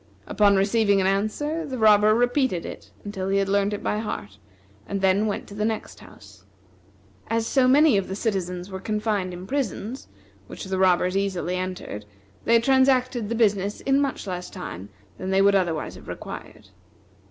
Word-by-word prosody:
Upon 205 Hz, -1 st, +3 dB
receiving 200 Hz, +1 st, +3 dB
an 190 Hz, -, +1 dB
answer, 215 Hz, +12 st, -1 dB
the 270 Hz, -4 st, -5 dB
robber 215 Hz, -1 st, +5 dB
repeated 245 Hz, -, +1 dB
it -, -, -9 dB, 0.2 s
until 195 Hz, -2 st, -4 dB
he 195 Hz, -, +2 dB
had 195 Hz, -1 st, +1 dB
learned 200 Hz, +1 st, +1 dB
it 205 Hz, -, -4 dB
by 210 Hz, -, 0 dB
heart, 105 Hz, -, -6 dB, 0.5 s
and 200 Hz, -, -2 dB
then 195 Hz, +2 st, +2 dB
went 205 Hz, -, -3 dB
to -, -, -10 dB
the 210 Hz, +1 st, -3 dB
next 220 Hz, 0 st, -3 dB
house. 100 Hz, -1 st, -16 dB, 0.8 s
As 225 Hz, 0 st, 0 dB
so 260 Hz, +1 st, +3 dB
many 280 Hz, -2 st, +5 dB
of 195 Hz, -, -5 dB
the 190 Hz, -, -4 dB
citizens 185 Hz, -4 st, -3 dB
were 190 Hz, -, -5 dB
confined 210 Hz, -2 st, -1 dB
in 180 Hz, +1 st, -8 dB
prisons, 255 Hz, 0 st, -3 dB, 0.4 s
which -, -, -8 dB
the 190 Hz, -1 st, -3 dB
robbers 185 Hz, 0 st, +3 dB
easily 185 Hz, -2 st, -1 dB
entered, 185 Hz, -, -5 dB, 0.4 s
they 230 Hz, 0 st, +5 dB
transacted 255 Hz, -2 st, +2 dB
the 230 Hz, -, -1 dB
business 205 Hz, -3 st, +1 dB
in 275 Hz, +1 st, +2 dB
much 275 Hz, -5 st, -2 dB
less 180 Hz, -2 st, -5 dB
time 100 Hz, -, -8 dB, 0.3 s
than 185 Hz, -, -4 dB
they 190 Hz, 0 st, +2 dB
would 200 Hz, +1 st, +5 dB
otherwise 175 Hz, -5 st, 0 dB
have -, -, -13 dB
required. -, -, -9 dB
200 Hz, 175 wpm, -24 LUFS, 185-230 Hz, 0.8 s, robber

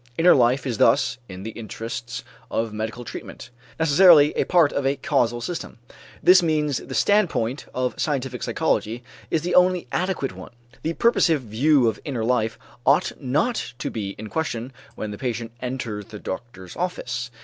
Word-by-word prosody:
Inner 175 Hz, +2 st, +6 dB
life 125 Hz, +2 st, +3 dB
is 120 Hz, -5 st, -3 dB
thus, 115 Hz, +2 st, +3 dB
in 95 Hz, 0 st, -8 dB
the 110 Hz, -, -5 dB
interests 115 Hz, +2 st, -6 dB, 0.3 s
of 115 Hz, -1 st, -2 dB
medical 110 Hz, +3 st, -4 dB
treatment, -, -, -9 dB, 0.3 s
necessarily 160 Hz, -1 st, +6 dB
a -, -, 0 dB
part 170 Hz, -5 st, +4 dB
of 140 Hz, -, -1 dB
a 135 Hz, +1 st, +1 dB
causal 120 Hz, -4 st, 0 dB
system. 170 Hz, 0 st, -5 dB, 0.5 s
This 185 Hz, +1 st, +7 dB
means 150 Hz, -5 st, +1 dB
the 130 Hz, -, -7 dB
standpoint 155 Hz, -, +1 dB
of 130 Hz, 0 st, -1 dB
scientific 135 Hz, -5 st, -2 dB
psychology 115 Hz, +3 st, -1 dB, 0.3 s
is 160 Hz, -, 0 dB
the 175 Hz, -, -1 dB
only 180 Hz, -1 st, +4 dB
adequate 180 Hz, -, -1 dB
one. 95 Hz, +5 st, -11 dB, 0.3 s
The 165 Hz, -, -2 dB
purposive 165 Hz, -, +3 dB
view 125 Hz, +4 st, +3 dB
of 110 Hz, -2 st, -1 dB
inner 125 Hz, -6 st, -3 dB
life 115 Hz, -2 st, +1 dB, 0.3 s
ought 145 Hz, +8 st, +3 dB
not 150 Hz, -, -1 dB
to -, -, -4 dB
be 100 Hz, -3 st, -4 dB
in 110 Hz, -, -7 dB
question 130 Hz, -5 st, -3 dB, 0.2 s
when 110 Hz, -, -5 dB
the 105 Hz, -, -8 dB
patient 120 Hz, -2 st, -3 dB
enters 120 Hz, -5 st, -4 dB
the 110 Hz, -2 st, -10 dB
doctor's 95 Hz, -2 st, -7 dB
office. 125 Hz, -9 st, -3 dB
125 Hz, 165 wpm, -23 LUFS, 115-155 Hz, 0.5 s, This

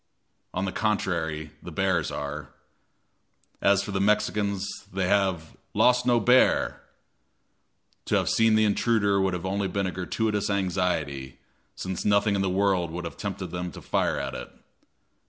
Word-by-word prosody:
On 95 Hz, -, -2 dB
the 95 Hz, -, -2 dB
contrary, 85 Hz, -8 st, -1 dB
the 90 Hz, -, -8 dB
bears 90 Hz, -2 st, +1 dB
are. 70 Hz, 0 st, -5 dB, 1.1 s
As 100 Hz, 0 st, +4 dB
for 100 Hz, -, -5 dB
the 95 Hz, -1 st, 0 dB
Mexicans, 100 Hz, -1 st, +1 dB, 0.2 s
they 95 Hz, -1 st, -1 dB
have 95 Hz, -5 st, +1 dB, 0.2 s
"lost 125 Hz, 0 st, +4 dB
no 120 Hz, -1 st, +4 dB
bear!" 125 Hz, +4 st, +3 dB, 1.2 s
To -, -, +1 dB
have -, -, +1 dB
seen 115 Hz, -1 st, +4 dB
the 110 Hz, 0 st, +4 dB
intruder 100 Hz, -2 st, +2 dB
would 95 Hz, -1 st, +1 dB
have 90 Hz, -, -5 dB
been 95 Hz, -, -2 dB
only 100 Hz, 0 st, 0 dB
a 95 Hz, -1 st, -1 dB
gratuitous 105 Hz, +3 st, -1 dB
anxiety, 90 Hz, -9 st, -1 dB, 0.4 s
since 95 Hz, -1 st, -4 dB
nothing 105 Hz, 0 st, +3 dB
in 100 Hz, -, +1 dB
the 95 Hz, -, +1 dB
world 95 Hz, -2 st, +1 dB
would 85 Hz, +2 st, -5 dB
have -, -, -6 dB
tempted -, -, -5 dB
them 90 Hz, 0 st, -4 dB
to -, -, -9 dB
fire -, -, 0 dB
at -, -, -3 dB
it. -, -, -6 dB
95 Hz, 155 wpm, -26 LUFS, 90-105 Hz, 1.2 s, As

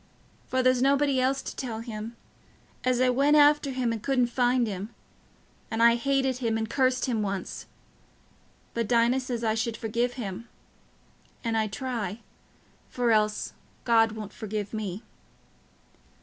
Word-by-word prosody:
for 260 Hz, 0 st, 0 dB
there's 255 Hz, -1 st, +3 dB
nobody 275 Hz, 0 st, +3 dB
else 265 Hz, +1 st, +1 dB
to -, -, -6 dB
tell 230 Hz, -4 st, -4 dB
him... 225 Hz, 0 st, -6 dB, 0.7 s
as 250 Hz, -1 st, +2 dB
I 255 Hz, 0 st, +4 dB
went 280 Hz, +4 st, +3 dB
after 295 Hz, -1 st, +5 dB
him 255 Hz, -3 st, -1 dB
and 225 Hz, -, -5 dB
couldn't 250 Hz, -1 st, +1 dB
find 245 Hz, -1 st, +3 dB
him... 200 Hz, -1 st, -5 dB, 0.8 s
and 225 Hz, +1 st, +1 dB
I 235 Hz, 0 st, +7 dB
hated 265 Hz, +1 st, +1 dB
him 225 Hz, -3 st, 0 dB
and 220 Hz, 0 st, -2 dB
cursed 255 Hz, +1 st, +1 dB
him 230 Hz, -4 st, 0 dB
once... 195 Hz, -2 st, -4 dB, 1.1 s
but 230 Hz, -2 st, -1 dB
Dinah 240 Hz, +2 st, +3 dB
says 245 Hz, -2 st, -4 dB
I 220 Hz, -1 st, +2 dB
should 225 Hz, 0 st, -2 dB
forgive 235 Hz, +2 st, -1 dB
him... 230 Hz, -2 st, -6 dB, 0.9 s
and 230 Hz, -1 st, -1 dB
I 220 Hz, -1 st, +1 dB
try... 215 Hz, -2 st, -4 dB, 0.7 s
for 245 Hz, -2 st, +1 dB
else 215 Hz, -1 st, +1 dB, 0.3 s
God 225 Hz, -2 st, +4 dB
won't 215 Hz, -2 st, -7 dB
forgive 210 Hz, -1 st, -5 dB
me." 210 Hz, -1 st, -4 dB
235 Hz, 150 wpm, -27 LUFS, 220-255 Hz, 1.1 s, I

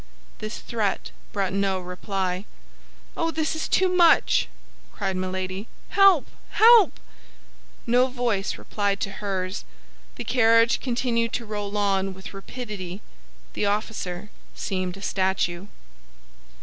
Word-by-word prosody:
This 215 Hz, +1 st, -5 dB
threat 215 Hz, -4 st, -2 dB, 0.2 s
brought 195 Hz, -2 st, -1 dB
no 195 Hz, -1 st, +1 dB
reply. 185 Hz, +1 st, -3 dB, 0.7 s
"Oh, 330 Hz, -, 0 dB
this 320 Hz, -1 st, -1 dB
is 315 Hz, -, -2 dB
too 375 Hz, -, +3 dB
much," 345 Hz, -, +4 dB, 0.4 s
cried 190 Hz, -, -2 dB
Milady. 185 Hz, +2 st, -3 dB, 0.2 s
"Help! 390 Hz, -7 st, +6 dB, 0.3 s
help!" 450 Hz, -5 st, +7 dB, 0.9 s
No 250 Hz, +2 st, +4 dB
voice 240 Hz, -6 st, -1 dB
replied 200 Hz, -1 st, -1 dB
to 195 Hz, -, -2 dB
hers; 190 Hz, -2 st, -3 dB, 0.5 s
the -, -, -5 dB
carriage 230 Hz, -1 st, +4 dB
continued 235 Hz, -2 st, 0 dB
to 235 Hz, -, -2 dB
roll 210 Hz, -1 st, -4 dB
on 195 Hz, -2 st, +1 dB
with 190 Hz, +2 st, -10 dB
rapidity; 195 Hz, -3 st, -7 dB, 0.5 s
the 205 Hz, -, 0 dB
officer 205 Hz, -2 st, -3 dB, 0.2 s
seemed 185 Hz, -1 st, -3 dB
a 195 Hz, -, -10 dB
statue. 190 Hz, -1 st, 0 dB
205 Hz, 115 wpm, -25 LUFS, 190-240 Hz, 0.9 s, help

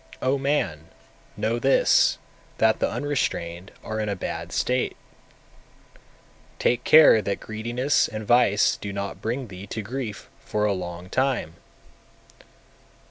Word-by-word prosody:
248. 130 Hz, -, -1 dB
O 140 Hz, -, 0 dB
man, 110 Hz, -, -1 dB, 0.5 s
know 110 Hz, +3 st, -1 dB
this, 135 Hz, +3 st, +4 dB, 0.4 s
that 110 Hz, 0 st, +3 dB
the -, -, +1 dB
unrestrained 95 Hz, -11 st, -3 dB
are 110 Hz, 0 st, -4 dB
in 105 Hz, -1 st, -2 dB
a 100 Hz, -, -1 dB
bad 90 Hz, -, -5 dB
state; 125 Hz, 0 st, -1 dB, 1.6 s
take 120 Hz, 0 st, +1 dB
care 155 Hz, -8 st, +7 dB
that 100 Hz, 0 st, -3 dB
greediness 120 Hz, +6 st, 0 dB
and 110 Hz, -1 st, -6 dB
vice 110 Hz, -3 st, +3 dB
do 100 Hz, -, -6 dB
not 100 Hz, 0 st, -5 dB
bring 120 Hz, +3 st, -3 dB
thee 95 Hz, 0 st, -10 dB
to 110 Hz, -, -5 dB
grief 110 Hz, -3 st, -6 dB
for 105 Hz, 0 st, -2 dB
a 105 Hz, -, +2 dB
long 90 Hz, -1 st, -6 dB
time! 130 Hz, -, -1 dB
110 Hz, 135 wpm, -24 LUFS, 100-125 Hz, 1.6 s, care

